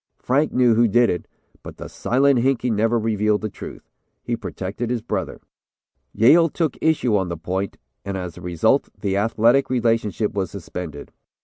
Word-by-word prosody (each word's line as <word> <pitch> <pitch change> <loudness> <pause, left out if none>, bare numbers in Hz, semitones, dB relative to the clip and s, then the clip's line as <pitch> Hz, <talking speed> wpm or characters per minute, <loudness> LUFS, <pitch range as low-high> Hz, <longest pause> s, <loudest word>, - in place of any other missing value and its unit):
Frank 140 +5 +1
knew 125 -2 +4
who 115 +1 +4
did 120 +3 +3
it, 90 - -4 0.3
but - - -10
the - - -7
'Silent 135 +1 +2
Hinkey' 125 -1 +1
never 115 +2 +2
revealed 105 -1 +1
the 110 - -3
real - - -22
truth. - - -10 0.3
He 120 - -1
protected 105 +1 -5
his 120 -2 -2
brother. - - -3 0.7
"Yale 160 +10 +5
took 160 -3 -1
issue 150 -8 +2
on 95 -3 0
the 85 - -4
point, 95 +4 -3 0.3
and 100 -1 -4
as 90 -3 -6
a - - -11
result 85 -2 +1
the 95 -1 -1
athletic 115 +6 +2
relationship 115 -4 0
was 95 -4 -2
suspended. 85 -5 -7
110 Hz, 175 wpm, -22 LUFS, 100-125 Hz, 0.7 s, Yale